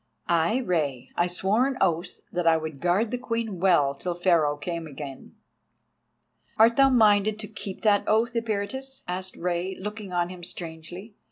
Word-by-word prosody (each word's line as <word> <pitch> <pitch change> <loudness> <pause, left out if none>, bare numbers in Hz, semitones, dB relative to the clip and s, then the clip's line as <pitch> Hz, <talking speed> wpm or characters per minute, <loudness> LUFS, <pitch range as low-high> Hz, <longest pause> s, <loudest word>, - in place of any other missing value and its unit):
"Ay, 170 +6 +2
Rei. 140 -8 -1
I 175 - +2
swore 195 +8 +1
an 270 -2 -3
oath 175 -1 0
that 175 -1 -1
I 165 -1 +6
would 155 -3 -6
guard 195 +6 +2
the 250 - -2
Queen 230 -6 -3
well 170 -7 +4
till 175 +5 -4
Pharaoh 170 -5 +2
came 165 +2 -4
again." 140 -2 -9 1.2
"Art 230 +2 +6
thou 270 0 +6
minded 215 -4 +4
to 215 -1 -7
keep 205 -2 -8
that 205 -2 +3
oath, 225 +3 +2
Eperitus?" 230 +4 -3
asked 185 +1 -4
Rei, 180 +2 -2
looking 210 0 -6
on 175 -1 0
him 180 -1 -9
strangely. 170 +5 -7
185 Hz, 165 wpm, -26 LUFS, 170-215 Hz, 1.2 s, I